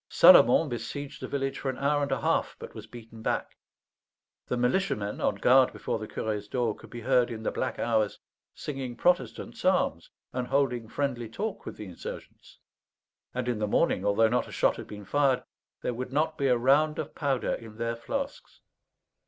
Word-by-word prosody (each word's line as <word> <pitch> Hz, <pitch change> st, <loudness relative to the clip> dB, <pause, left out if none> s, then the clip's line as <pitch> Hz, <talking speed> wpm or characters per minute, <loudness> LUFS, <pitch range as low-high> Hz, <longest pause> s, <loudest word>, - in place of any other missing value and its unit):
Salomon 125 Hz, +7 st, +7 dB
besieged 140 Hz, +4 st, -5 dB
the -, -, -4 dB
village 135 Hz, -1 st, -2 dB
for 135 Hz, -, -2 dB
an 130 Hz, -, -3 dB
hour 145 Hz, +1 st, +1 dB
and 140 Hz, -, -1 dB
a -, -, 0 dB
half, -, -, +1 dB
but -, -, -9 dB
was 110 Hz, 0 st, -9 dB
beaten 115 Hz, -1 st, -11 dB
back. -, -, -2 dB, 0.9 s
The 125 Hz, -, -1 dB
militiamen, 125 Hz, -, 0 dB
on -, -, +1 dB
guard 130 Hz, +5 st, +5 dB
before -, -, -3 dB
the 110 Hz, -, -6 dB
curé's 105 Hz, -2 st, -3 dB
door, 120 Hz, -2 st, 0 dB
could -, -, -14 dB
be 120 Hz, -, -8 dB
heard, 125 Hz, 0 st, +3 dB
in 110 Hz, -2 st, -6 dB
the -, -, 0 dB
black -, -, -2 dB
hours, 110 Hz, -3 st, +1 dB, 0.4 s
singing 135 Hz, -4 st, -5 dB
Protestant 135 Hz, -10 st, 0 dB
psalms -, -, +1 dB, 0.2 s
and 125 Hz, -1 st, -2 dB
holding 125 Hz, -4 st, +1 dB
friendly 125 Hz, -4 st, -2 dB
talk 205 Hz, -, -4 dB
with -, -, -6 dB
the 105 Hz, -, -7 dB
insurgents. 90 Hz, -3 st, -9 dB, 0.8 s
And 125 Hz, -1 st, -2 dB
in 120 Hz, -3 st, 0 dB
the 105 Hz, -, 0 dB
morning, 100 Hz, -, +2 dB
although 100 Hz, +2 st, +4 dB
not 120 Hz, +3 st, 0 dB
a -, -, -11 dB
shot -, -, +2 dB
had -, -, -8 dB
been 105 Hz, -1 st, -9 dB
fired, 140 Hz, +3 st, +2 dB, 0.4 s
there 125 Hz, -, -1 dB
would 125 Hz, +2 st, -5 dB
not 155 Hz, +3 st, +1 dB
be 140 Hz, -3 st, 0 dB
a 125 Hz, -2 st, +4 dB
round 145 Hz, +5 st, +3 dB
of 155 Hz, -, -4 dB
powder 140 Hz, -4 st, 0 dB
in 110 Hz, -2 st, -8 dB
their 115 Hz, 0 st, -1 dB
flasks. 275 Hz, -, -5 dB
125 Hz, 190 wpm, -28 LUFS, 110-140 Hz, 0.9 s, Salomon